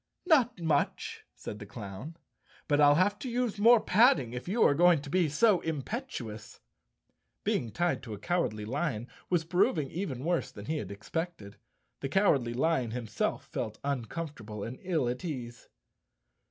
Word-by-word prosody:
"Not 255 - +4
much," 160 -4 -1
said 105 - -7
the 105 - -9
clown, 110 - -8 0.5
"but 145 0 +3
I'll 145 0 +7
have 205 +5 +2
to 255 - -4
use 240 -3 -1
more 230 +2 +7
padding 205 - +4
if 125 +5 -6
you 215 +6 +2
are - - +6
going 175 +1 +5
to 140 - -8
be 180 -4 +3
so 185 +6 +4
impetuous." 150 - -5 0.8
Being 115 - 0
tied 175 +5 0
to 110 - -7
a - - -10
Cowardly 110 - -1
Lion 125 -2 -2 0.2
was 175 -3 +2
proving 175 - +1
even 150 -9 -4
worse 170 +1 0
than 100 -1 -10
he 155 +6 -1
had 105 -10 -5
expected. 110 - -5 0.4
The 135 - -3
Cowardly 140 -10 +2
Lion 135 -3 +1
himself 115 -2 -2
felt 110 0 -4
uncomfortable 130 -5 -4
and 120 +3 -6
ill 165 -9 0
at 125 +7 -3
ease. 120 -8 -6
150 Hz, 160 wpm, -30 LUFS, 120-180 Hz, 0.8 s, I'll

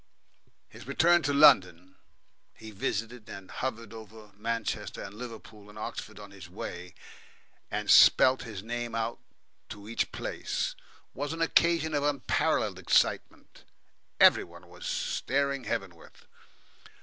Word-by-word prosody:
His - - -14
return 170 +5 +4
to 145 - -1
London 95 - +4 0.6
he 110 0 -11
visited 115 +3 -4
and 100 -1 -10
hovered 115 -4 -5
over 110 -1 -12
Manchester 105 -2 -4
and 100 - -9
Liverpool 110 -2 -10
and 105 - -14
Oxford 110 -1 -7
on 100 -1 -11
his 95 -4 -12
way, 90 -1 -8 0.7
and - - -3
spelt 130 0 +6
his 105 -5 -8
name 120 0 -4
out 115 +1 -2 0.5
to 100 0 -10
each 115 - -2
place - - -3 0.4
was 145 +3 -4
an 165 - -6
occasion 165 -1 +2
of 145 - +1
unparalleled 145 -3 0
excitement. - - 0 0.6
Every - - +6
one 85 +1 -15
was 90 +1 -9
staring 140 -1 -1
heavenward. 90 -4 -5
110 Hz, 125 wpm, -29 LUFS, 100-130 Hz, 0.7 s, spelt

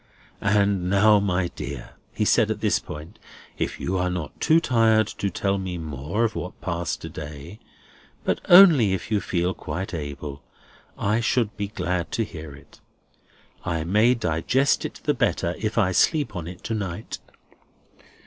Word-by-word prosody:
"And 100 -2 +2
now, 105 +2 +5
my 95 -3 0
dear," - - -7 0.2
he - - -1
said - - +3
at - - -2
this - - +2
point, 80 +8 -10 0.4
"if - - -2
you 95 +1 -1
are 90 0 +1
not 90 -3 -5
too 160 0 +5
tired 115 -6 +3
to 100 -1 -3
tell 100 +2 -1
me 95 -2 -4
more 80 - -3
of 115 -2 +1
what 90 - -6
passed 85 -1 -3
to - - -5
day—but 75 +6 -8
only 165 - +8
if 95 - -7
you 105 -2 +2
feel 90 0 -1
quite 95 +3 -5
able—I 75 +7 -5
should 115 -1 0
be 100 -1 -3
glad 90 -4 -3
to 115 - +1
hear 80 -7 -8
it. - - -18 0.8
I 80 -3 -2
may 105 +8 +3
digest 115 - +1
it - - -7
the - - +2
better, - - 0
if - - -3
I 90 - +3
sleep 145 - +2
on 85 -2 -5
it 90 0 -10
to 115 - -3
night." 105 -1 -4
95 Hz, 160 wpm, -24 LUFS, 85-110 Hz, 0.8 s, only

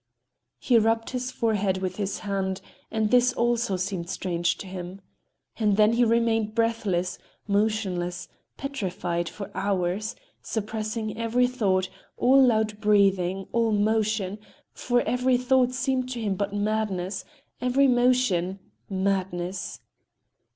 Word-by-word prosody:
He 240 -3 +3
rubbed 225 +1 +1
his 255 0 -3
forehead 205 -6 0
with 185 -1 -3
his 200 -1 -3
hand, 190 -1 -1 0.3
and 220 -1 0
this 250 0 +5
also 235 -5 +1
seemed 185 -2 -3
strange 175 -3 -1
to - - -8
him. 185 0 -7 0.6
And 210 -3 +2
then 215 +1 +5
he 240 +1 +3
remained 225 -2 +2
breathless, 210 -6 0 0.3
motionless, 200 -4 -1 0.3
petrified 180 -10 -3
for 200 -1 -8
hours, 195 +2 -1 0.3
suppressing 215 0 -3
every 230 +2 +2
thought, 200 -7 +1 0.3
all 270 +2 +5
loud 220 -4 +2
breathing, 195 -2 +2
all 230 -1 +2
motion,—for 215 +2 -1
every 250 0 +2
thought 250 0 +3
seemed 260 0 -1
to 250 -2 -4
him 210 -3 -1
but 200 +1 -2
madness, 205 -3 -1 0.4
every 255 +3 +3
motion—madness. 195 -5 0
210 Hz, 115 wpm, -26 LUFS, 190-235 Hz, 0.6 s, this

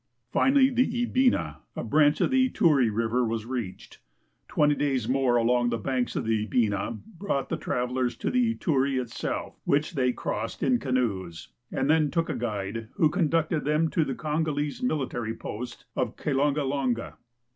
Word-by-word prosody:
Finally 270 0 +4
the 245 -1 +1
Ibina, 240 - +1 0.2
a - - -3
branch 145 +5 +3
of - - +2
the 260 -1 +4
Ituri 150 - +3
river, 115 +3 +1
was 115 -1 -2
reached. 120 -7 -6 0.5
Twenty 150 0 +3
days 135 -6 0
more 130 -1 +2
along 120 +1 +3
the 115 - -1
banks 125 +2 -2
of - - -2
the 110 -1 0
Ibina 110 0 0 0.2
brought 160 -9 -1
the - - 0
travelers 125 0 -1
to - - -2
the 245 -2 +2
Ituri 135 -4 +1
itself, 120 -2 -4
which 145 +4 +1
they 130 -4 +2
crossed 115 -2 -4
in 250 -2 +3
canoes, 100 - -2 0.2
and 135 - 0
then 155 -1 +3
took 165 +2 -1
a 155 - -1
guide, 110 -2 -3
who 155 -2 +3
con 160 -2 +1
ducted 165 -1 +1
them 155 +2 +1
to 165 - +2
the 135 -3 -3
Kongolese 150 - -2
military 125 - -2
post 120 +3 -7
of - - -1
Kilongalonga. 140 -3 0
135 Hz, 165 wpm, -27 LUFS, 115-155 Hz, 0.5 s, Finally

